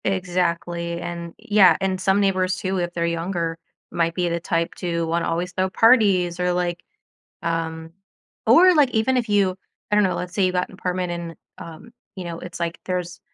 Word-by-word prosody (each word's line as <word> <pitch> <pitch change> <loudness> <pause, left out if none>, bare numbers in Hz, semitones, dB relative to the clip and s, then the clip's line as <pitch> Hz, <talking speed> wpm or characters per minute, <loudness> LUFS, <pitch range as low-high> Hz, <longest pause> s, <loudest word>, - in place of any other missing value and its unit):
Exactly, 175 -2 -1
and 170 -1 -6
yeah, 205 -3 +5
and 190 -1 -1
some 190 +1 +2
neighbors 185 -2 +1
too, 190 0 -2
if 175 0 -2
they're 170 -1 -1
younger, 170 0 -2 0.3
might 165 -1 0
be 180 -1 0
the 170 0 -1
type 170 -1 -1
to 170 -2 -2
wanna 165 +1 -1
always 175 +2 -2
throw 185 +1 0
parties 195 -6 +4
or, 180 0 +1
like, 175 -1 -1 0.6
um 165 -1 -3 0.5
or, 365 +1 +7
like, 290 -5 +4
even 245 +3 +1
if 240 -3 0
you 200 -3 +2 0.3
I - - +2
don't 210 - +5
know, 185 - 0
let's 180 0 -5
say 195 - +2
you 185 - +1
got 180 0 -1
an - - -14
apartment 180 -1 -2
and, 170 -1 -5 0.2
um, 170 +8 -11 0.2
you 185 - -7
know, 170 -1 -6
it's 175 -1 -9
like 170 0 -2
there's 180 -2 -4
180 Hz, 195 wpm, -22 LUFS, 170-190 Hz, 0.6 s, or